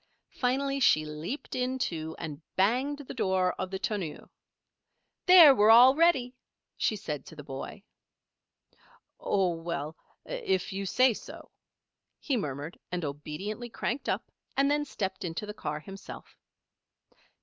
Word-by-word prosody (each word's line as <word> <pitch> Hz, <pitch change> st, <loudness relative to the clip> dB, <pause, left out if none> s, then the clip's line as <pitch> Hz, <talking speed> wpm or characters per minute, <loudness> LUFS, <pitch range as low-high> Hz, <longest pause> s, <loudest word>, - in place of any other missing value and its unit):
Finally 275 Hz, +2 st, 0 dB
she 155 Hz, -, +4 dB
leaped 155 Hz, -, -6 dB
in, 255 Hz, +1 st, -1 dB
too, 160 Hz, -9 st, -3 dB
and 155 Hz, -2 st, -6 dB
banged 250 Hz, +9 st, +2 dB
the 285 Hz, -2 st, -8 dB
door 190 Hz, -5 st, +1 dB
of 185 Hz, -, -2 dB
the 190 Hz, -, -3 dB
tonneau. 190 Hz, -6 st, -4 dB, 1.0 s
"There! 345 Hz, -6 st, +10 dB
we're 210 Hz, -3 st, +4 dB
all 245 Hz, +3 st, +9 dB
ready," 280 Hz, -6 st, +3 dB, 0.4 s
she 215 Hz, -, 0 dB
said 160 Hz, -9 st, -5 dB
to 160 Hz, -, -11 dB
the 150 Hz, -, -9 dB
boy. 140 Hz, +9 st, -7 dB, 1.4 s
"Oh 190 Hz, -3 st, +1 dB
well 165 Hz, -2 st, -4 dB, 0.3 s
if 425 Hz, -, -2 dB
you 195 Hz, 0 st, -3 dB
say 255 Hz, +5 st, +4 dB
so," -, -, -11 dB, 0.7 s
he 280 Hz, -, -1 dB
murmured, 145 Hz, -, -4 dB
and 180 Hz, -2 st, -2 dB
obediently 155 Hz, -, -5 dB
cranked 245 Hz, +4 st, -3 dB
up -, -, -2 dB, 0.3 s
and 275 Hz, +1 st, +3 dB
then 295 Hz, 0 st, +1 dB
stepped 200 Hz, -7 st, -4 dB
into 175 Hz, +4 st, -4 dB
the 210 Hz, -, -6 dB
car 150 Hz, -7 st, -4 dB
himself. 195 Hz, +5 st, -11 dB
205 Hz, 140 wpm, -29 LUFS, 165-260 Hz, 1.4 s, There